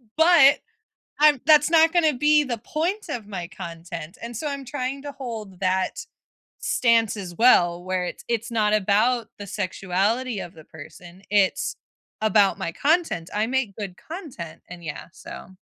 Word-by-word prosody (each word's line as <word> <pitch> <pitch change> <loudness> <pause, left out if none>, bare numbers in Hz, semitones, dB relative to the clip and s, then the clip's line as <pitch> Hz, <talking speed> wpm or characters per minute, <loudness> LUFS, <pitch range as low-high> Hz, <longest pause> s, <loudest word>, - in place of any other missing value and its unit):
But 320 -4 +6 0.6
I'm 295 -3 +5
that's 300 0 +5
not 325 -1 +5
gonna 320 -4 +3
be 295 +3 +3
the 250 -4 -3
point 335 - -3
of 240 -8 -5
my 180 -4 -6
content, 170 -3 -8
and 235 -1 -6
so 305 - -4
I'm 280 -2 -4
trying 265 +1 -4
to 290 - -6
hold 225 -8 -7
that 185 0 -1 0.5
stance 230 -3 +2
as 185 -4 -7
well, 175 -8 +4
where 185 0 -2
it's 180 - -7
it's 230 -1 -1
not 215 -2 +2
about 215 +4 +2
the 205 - -7
sexuality 205 +5 -1
of 170 - -8
the 160 - -13
person, 175 +4 -13
it's 200 -2 +2 0.5
about 215 -2 +3
my - - -3
content, 300 - 0
I 215 +2 0
make 255 -6 -1
good 195 -4 -6
content, 295 - -9
and 175 -1 -10
yeah, 155 -3 -6
so 185 - -11
220 Hz, 160 wpm, -24 LUFS, 185-280 Hz, 0.6 s, But